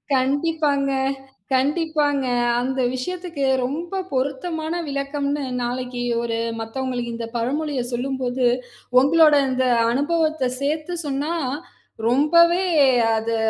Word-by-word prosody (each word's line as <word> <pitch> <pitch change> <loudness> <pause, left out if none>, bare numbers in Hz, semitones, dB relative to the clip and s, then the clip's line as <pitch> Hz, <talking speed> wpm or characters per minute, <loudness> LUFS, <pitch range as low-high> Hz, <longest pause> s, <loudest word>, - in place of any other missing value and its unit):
கண்டிப்பாங்க, 280 +1 +1 0.6
கண்டிப்பாங்க. 290 0 +1 0.3
அந்த 265 +2 -2 0.2
விஷயத்துக்கு 340 0 -3 0.2
ரொம்ப 340 +8 -3
பொருத்தமான 310 +5 -2 0.2
விளக்கம்ன்னு 280 +1 -2 0.2
நாளைக்கு 245 0 -3 0.2
ஒரு 230 -1 -2 0.2
மத்தவங்களுக்கு 245 0 -3
இந்த 230 -1 -5
பழமொழிய 275 +3 -1
சொல்லும்போது, 255 0 -1 0.5
உங்களோட 305 +2 +5 0.2
இந்த 260 0 +1 0.3
அனுபவத்த 310 +2 0 0.2
சேர்த்து 310 +4 -2
சொன்னா 285 +3 -2 0.7
ரொம்பவே 340 +8 +4 0.5
அது 225 +1 -1
280 Hz, 90 wpm, -22 LUFS, 255-315 Hz, 0.7 s, உங்களோட